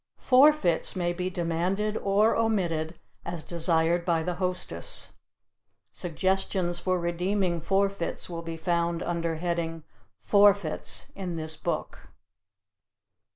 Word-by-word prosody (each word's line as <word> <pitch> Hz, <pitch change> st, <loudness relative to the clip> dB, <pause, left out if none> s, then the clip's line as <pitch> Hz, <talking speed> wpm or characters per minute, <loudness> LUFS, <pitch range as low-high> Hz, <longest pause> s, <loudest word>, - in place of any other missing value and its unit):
Forfeits 260 Hz, -, +4 dB
may 175 Hz, -1 st, 0 dB
be 180 Hz, +1 st, -2 dB
demanded 180 Hz, +5 st, -1 dB
or 205 Hz, +2 st, +3 dB
omitted 175 Hz, -8 st, 0 dB, 0.2 s
as 170 Hz, -2 st, -4 dB
desired 170 Hz, 0 st, +2 dB
by 170 Hz, -2 st, +1 dB
the 180 Hz, -, -1 dB
hostess. 185 Hz, -, -4 dB, 0.8 s
Suggestions 185 Hz, 0 st, -1 dB
for 185 Hz, -1 st, 0 dB
redeeming 175 Hz, +1 st, 0 dB
forfeits 195 Hz, -1 st, 0 dB
will 170 Hz, -2 st, -5 dB
be 165 Hz, 0 st, -6 dB
found 170 Hz, 0 st, 0 dB
under 170 Hz, -1 st, -1 dB
heading 165 Hz, -1 st, -2 dB, 0.3 s
"Forfeits" 200 Hz, -5 st, +2 dB
in 185 Hz, -3 st, -5 dB
this 160 Hz, -1 st, -3 dB
book. -, -, -4 dB
175 Hz, 110 wpm, -27 LUFS, 165-195 Hz, 0.8 s, Forfeits